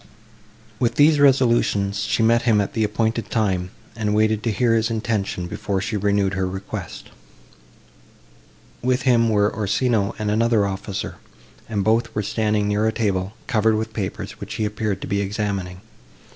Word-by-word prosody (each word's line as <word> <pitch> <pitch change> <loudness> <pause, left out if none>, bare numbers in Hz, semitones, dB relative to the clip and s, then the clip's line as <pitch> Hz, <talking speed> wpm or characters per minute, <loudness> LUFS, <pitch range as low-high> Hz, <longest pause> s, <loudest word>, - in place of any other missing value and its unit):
With 120 - +1
these 150 +1 +5
resolutions 120 -7 +3
she 110 +1 +1
met 115 +1 +4
him 115 -3 +3
at 100 - -1
the 110 - 0
appointed 110 +2 -1
time, 95 -5 0 0.3
and 105 -2 -1
waited 110 0 +2
to 115 - -1
hear 115 +2 +2
his 115 0 +2
intention 110 -5 -2
before 95 +2 -3
she 105 +3 -3
renewed 100 -1 +1
her 95 -1 -1
request. 95 +1 -7 1.7
With 125 +1 +1
him 120 -3 +3
were 105 -1 +2
Orsino 105 0 0
and 105 -1 -1
another 115 -1 +2
officer, 100 0 -4 0.5
and 105 -3 -1
both 115 +1 +1
were 105 - 0
standing 105 0 0
near 105 +1 +1
a - - +2
table, 100 -3 -1
covered 110 -3 +2
with 110 0 -3
papers, 100 -3 -5
which 110 +2 -6
he 110 -1 -1
appeared 105 -2 -2
to - - -5
be 100 +1 0
examining. 100 -3 -3
110 Hz, 160 wpm, -22 LUFS, 100-115 Hz, 1.7 s, these